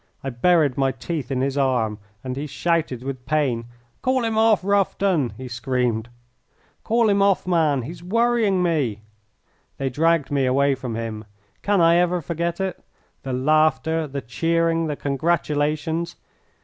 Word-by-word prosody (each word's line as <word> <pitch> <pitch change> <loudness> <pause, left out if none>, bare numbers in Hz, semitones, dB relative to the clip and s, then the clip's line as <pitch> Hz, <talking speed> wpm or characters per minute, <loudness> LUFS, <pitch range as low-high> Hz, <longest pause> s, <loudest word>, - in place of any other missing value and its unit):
I 135 - -3
buried 145 +1 +2
my 135 -1 +2
teeth 135 +1 -5
in 130 -2 -1
his 135 +1 -1
arm, 120 -6 0 0.2
and 130 -1 -4
he 145 +3 -4
shouted 155 -5 -1
with 130 -2 -6
pain. 135 -7 0 0.4
"Call 260 -1 +1
him 225 -1 -1
off, 220 -3 +4
Rufton!" 195 - +1
he 130 +1 -7
screamed. 120 -2 -1 0.7
"Call 230 0 +2
him 200 -1 +3
off, 195 -1 +3
man! 160 -7 +2
He's 165 +7 -8
worrying 225 -1 +2
me!" 135 - 0 0.7
They 135 -1 -2
dragged 160 +1 +1
me 135 -2 +1
away 140 +2 +3
from 125 -3 -5
him. 110 -1 -5 0.4
Can 205 -3 +2
I 165 +1 +5
ever 180 0 +2
forget 170 +2 -3
it? 190 -1 -3 0.4
the 135 - -5
laughter, 155 +3 +2
the 140 0 -5
cheering, 165 +5 0
the 150 - -2
congratulations! 150 +2 -1
155 Hz, 150 wpm, -22 LUFS, 130-175 Hz, 0.7 s, I